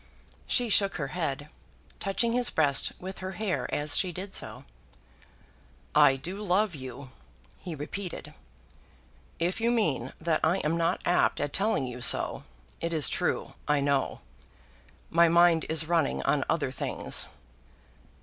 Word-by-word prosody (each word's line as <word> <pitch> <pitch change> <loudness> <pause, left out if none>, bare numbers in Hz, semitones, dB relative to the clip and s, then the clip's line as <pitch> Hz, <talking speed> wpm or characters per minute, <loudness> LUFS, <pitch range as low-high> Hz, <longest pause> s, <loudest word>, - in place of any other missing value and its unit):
She 245 -2 +2
shook 200 -1 +3
her 140 -5 -3
head, 145 -4 -3 0.5
touching 230 +4 0
his 245 0 +2
breast 145 -4 +1
with 190 +1 -7
her 190 0 -5
hair 190 0 -2
as 145 0 +1
she 185 - +1
did 190 +3 -7
so. - - -2 1.3
"I 135 - +6
do 170 +9 -5
love 200 0 +2
you," 130 -1 -8 0.5
he 175 -4 -6
repeated. 175 +6 -6 1.0
"If 180 +6 -1
you 230 - +2
mean 155 - 0
that 160 -1 +1
I 165 +4 +3
am 155 +2 +1
not 170 +1 0
apt 175 - +2
at 145 - -2
telling 200 -8 +1
you 125 0 -7
so, - - +2 0.4
it 170 0 -2
is 155 -5 +3
true, - - -1
I 150 -1 +3
know. 140 -1 0 0.9
My 170 0 +5
mind 170 -1 +4
is 160 0 +3
running 160 - +1
on - - +1
other - - 0
things." - - -2
170 Hz, 145 wpm, -28 LUFS, 145-190 Hz, 1.3 s, I